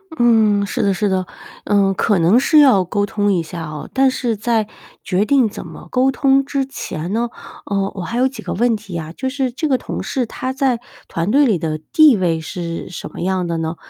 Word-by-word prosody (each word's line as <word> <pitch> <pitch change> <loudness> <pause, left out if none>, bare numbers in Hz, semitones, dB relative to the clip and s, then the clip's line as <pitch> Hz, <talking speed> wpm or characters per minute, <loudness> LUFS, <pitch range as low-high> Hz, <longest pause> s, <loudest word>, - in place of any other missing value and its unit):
嗯， 220 -5 +3
是 230 +4 -2
的 200 -2 +2
是 205 +1 0
的， 185 -1 0 0.4
嗯， 200 -1 +2
可 205 +2 +1
能 185 +9 +5
是 305 +3 +4
要 255 -10 +6
沟 205 +3 0
通 205 0 0
一 170 - 0
下 165 +1 -7
哦。 150 -2 -7
但 265 0 +4
是 240 -4 -2
在 225 0 0 0.4
决 190 +3 0
定 260 -3 +3
怎 - - -8
么 - - -11
沟 260 +1 +3
通 275 0 +2
之 275 -1 -1
前 175 -9 -6
呢， 235 +2 0 0.4
呃， 195 -1 -1
我 190 - -6
还 230 +7 -4
有 255 - +3
几 270 - -8
个 - - -4
问 235 +2 +2
题 200 -5 -7
啊， 160 0 -6
就 260 +9 -4
是 265 -2 -2
这 285 +6 -2
个 265 -3 +2
同 - - -5
事 255 -3 -2
他 255 +3 -4
在 260 -3 +1 0.3
团 165 +3 -2
队 280 +6 +4
里 210 -9 +2
的 155 -1 -2
地 310 -5 +6
位 175 -5 0
是 170 0 -5
什 180 - -8
么 - - -10
样 185 0 0
的 170 - -2
呢？ 160 +1 -3
210 Hz, 240 characters per minute, -19 LUFS, 185-260 Hz, 0.4 s, 要